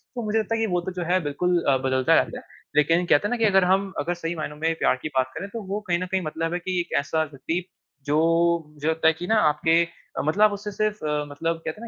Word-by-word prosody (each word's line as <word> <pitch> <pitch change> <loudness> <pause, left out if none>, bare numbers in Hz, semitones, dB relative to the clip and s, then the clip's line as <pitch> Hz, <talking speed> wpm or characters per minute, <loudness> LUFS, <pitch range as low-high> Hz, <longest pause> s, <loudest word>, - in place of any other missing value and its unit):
तो 240 - -3
मुझे 215 +1 +1
लगता 220 +1 -1
है 225 - -1
कि 225 - +1
वो 175 - +1
तो 190 - -5
जो - - -1
है 185 - +4
बिल्कुल 175 +4 0
अ, 135 -1 +4
बदलता 130 0 +2
रहता - - +1
है। - - -20 0.2
लेकिन 165 +4 +3
कहते 170 +3 +3
हैं - - -5
ना 245 - 0
कि 230 - -1
अगर 195 -2 +4
हम, 190 +1 +1
अगर 165 +5 -1
सही 175 -1 -4
मायनों 155 -2 -5
में 160 +2 0
प्यार - - +3
की - - -3
बात 130 0 +1
करें, 200 - -5
तो 230 +2 -6
वो 200 +2 -2
कहीं 175 -1 +1
न 185 - -2
कहीं 190 -1 +1
मतलब 165 +2 -3
है 175 - -1
कि 180 0 -2
एक 175 - -8
ऐसा 150 +3 0
व्यक्ति 155 +4 -4 0.4
जो, 165 +3 +2
मुझे 150 0 -5
लगता 160 0 +2
है 160 - +5
कि 175 +3 -7
ना 225 - +3
आपके 160 +3 +3 0.3
अ, - - +1
मतलब 205 +7 +4
उससे 205 +1 -5
सिर्फ़ 210 -2 -2
अ, 150 -1 -1
मतलब 165 +3 -2
कहते 160 +7 -5
हैं - - -7
170 Hz, 280 wpm, -24 LUFS, 155-190 Hz, 0.4 s, है